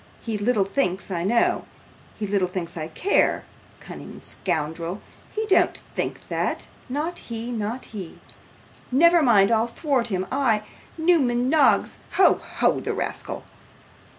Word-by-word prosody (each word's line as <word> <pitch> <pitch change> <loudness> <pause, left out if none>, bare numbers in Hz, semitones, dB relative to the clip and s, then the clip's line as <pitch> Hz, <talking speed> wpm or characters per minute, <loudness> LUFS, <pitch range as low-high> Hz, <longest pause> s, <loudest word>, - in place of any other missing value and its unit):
He 225 -2 -4
little 210 -1 +2
thinks 195 -4 -1
I 170 -2 -1
know; 230 +5 +2 0.5
he 215 - -2
little 195 -2 +1
thinks 175 -2 -5
I 155 -2 -4
care. 370 - +1 0.3
Cunning - - -10
scoundrel! 165 +2 -3 0.3
he 435 +1 -2
don't 390 - +3 0.2
think - - -3
that. - - -1 0.2
Not 305 +6 -2
he, 230 +1 -6
not 225 +2 -3
he. 190 -6 -8 0.7
Never 335 +6 +6
mind, 215 -6 +5
I'll 225 +1 +3
thwart 260 -1 0
him 190 -4 -1
I, 250 -6 +2 0.3
Newman 265 -8 +3
Noggs. 300 -1 +3 0.2
Ho, 380 - +5
ho, - - +1
the - - -3
rascal! - - -3
230 Hz, 135 wpm, -24 LUFS, 195-275 Hz, 0.7 s, Never